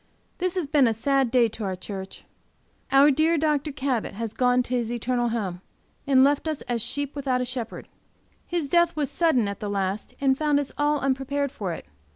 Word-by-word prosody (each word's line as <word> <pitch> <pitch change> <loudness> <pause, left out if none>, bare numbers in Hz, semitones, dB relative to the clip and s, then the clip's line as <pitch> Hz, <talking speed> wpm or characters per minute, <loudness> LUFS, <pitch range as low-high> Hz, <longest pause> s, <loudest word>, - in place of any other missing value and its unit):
This 365 0 0
has 365 -4 0
been 280 -3 +4
a 225 - +1
sad 270 +2 +1
day 240 -1 +4
to 220 +1 -7
our 190 -2 -2
church. 190 +1 -8 0.7
Our 275 +2 +7
dear 315 +4 +2
Dr. 300 -1 0
Cabot 265 -7 -2
has 225 0 -4
gone 250 0 +3
to 245 - -6
his 240 -2 0
eternal 240 0 0
home, 195 -6 -3 0.5
and 265 -2 +6
left 285 +3 +2
us 310 -2 -2
as 240 -2 -2
sheep 285 +5 -3
without 265 -3 0
a 250 - -1
shepherd. 245 -2 -5 0.6
His 340 -4 -1
death 345 +2 +3
was 290 -2 -1
sudden 285 -9 +2
at 200 -1 -5
the 210 - -4
last 195 0 -2
and 270 -1 +3
found 295 0 +2
us 285 - -4
all 295 0 +1
unprepared 275 +1 -1
for 200 -9 -4
it. - - -8
265 Hz, 200 wpm, -25 LUFS, 230-290 Hz, 0.7 s, Our